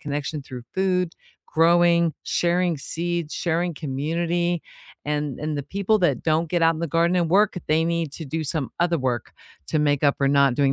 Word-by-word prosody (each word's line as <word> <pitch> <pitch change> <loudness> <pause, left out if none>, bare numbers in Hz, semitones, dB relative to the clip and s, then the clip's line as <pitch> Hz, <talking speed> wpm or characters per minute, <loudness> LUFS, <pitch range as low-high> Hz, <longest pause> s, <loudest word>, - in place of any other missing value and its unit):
connection 145 0 -4
through 125 -2 -9
food, 180 -2 0 0.3
growing, 170 0 +4
sharing 175 -1 +1
seeds, 170 +1 -3
sharing 170 +1 0
community, 165 +5 -1 0.4
and 150 -2 -2
and 150 -1 -2
the 145 - -2
people 200 +6 0
that 175 - +1
don't 160 +1 +1
get 175 -2 +1
out 165 0 +4
in 155 - -6
the 170 - -1
garden 170 +4 +2
and 170 -2 +1
work, 200 +1 +3
they 160 +1 +3
need 170 -2 -1
to 160 - -7
do 160 +3 -3
some 145 -2 -2
other 170 -1 +2
work 125 -4 -2 0.4
to 155 - +1
make 145 -1 +1
up 140 - +3
for 140 - +2
not 140 -2 +4
doing 140 0 +2
165 Hz, 190 wpm, -23 LUFS, 145-175 Hz, 0.4 s, growing